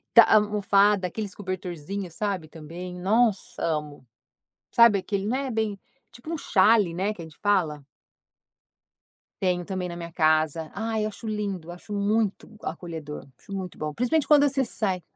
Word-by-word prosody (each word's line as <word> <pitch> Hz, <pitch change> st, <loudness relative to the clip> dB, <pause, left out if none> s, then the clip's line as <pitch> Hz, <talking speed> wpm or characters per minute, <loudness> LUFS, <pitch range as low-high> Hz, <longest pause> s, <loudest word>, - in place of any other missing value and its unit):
Tá 235 Hz, -, +11 dB
almofada, 205 Hz, -2 st, +4 dB
aqueles 205 Hz, +2 st, -5 dB
cobertorzinho, 185 Hz, -1 st, -5 dB
sabe, 185 Hz, -3 st, -3 dB
também, 175 Hz, +3 st, -8 dB
nossa 210 Hz, +2 st, +1 dB
amo! 150 Hz, -4 st, -2 dB, 0.7 s
Sabe 235 Hz, -3 st, +6 dB
aquele, 195 Hz, +1 st, -2 dB
né, 260 Hz, +3 st, -1 dB
bem 220 Hz, -3 st, -1 dB, 0.3 s
tipo 240 Hz, +7 st, -9 dB
um -, -, -1 dB
xale, 205 Hz, -, +4 dB
né, 195 Hz, +4 st, 0 dB
que 185 Hz, -, -10 dB
a -, -, -7 dB
gente 160 Hz, -1 st, -15 dB
fala? 165 Hz, -9 st, 0 dB, 1.6 s
Tenho 180 Hz, -2 st, +1 dB
também 185 Hz, -1 st, -3 dB
na 170 Hz, -, -6 dB
minha 170 Hz, -1 st, -7 dB
casa, 155 Hz, -1 st, +2 dB
ai 220 Hz, +1 st, -2 dB
eu -, -, 0 dB
acho 215 Hz, +2 st, -9 dB
lindo, 200 Hz, -6 st, -3 dB
acho 180 Hz, +4 st, -12 dB
muito 205 Hz, 0 st, 0 dB
acolhedor, 160 Hz, -3 st, -6 dB
acho -, -, -15 dB
muito 190 Hz, -2 st, -5 dB
bom, 155 Hz, 0 st, -4 dB
principalmente 250 Hz, -, +1 dB
quando 290 Hz, -1 st, +6 dB
você 275 Hz, -1 st, +2 dB
sai. 195 Hz, -6 st, 0 dB
195 Hz, 155 wpm, -26 LUFS, 170-215 Hz, 1.6 s, Tá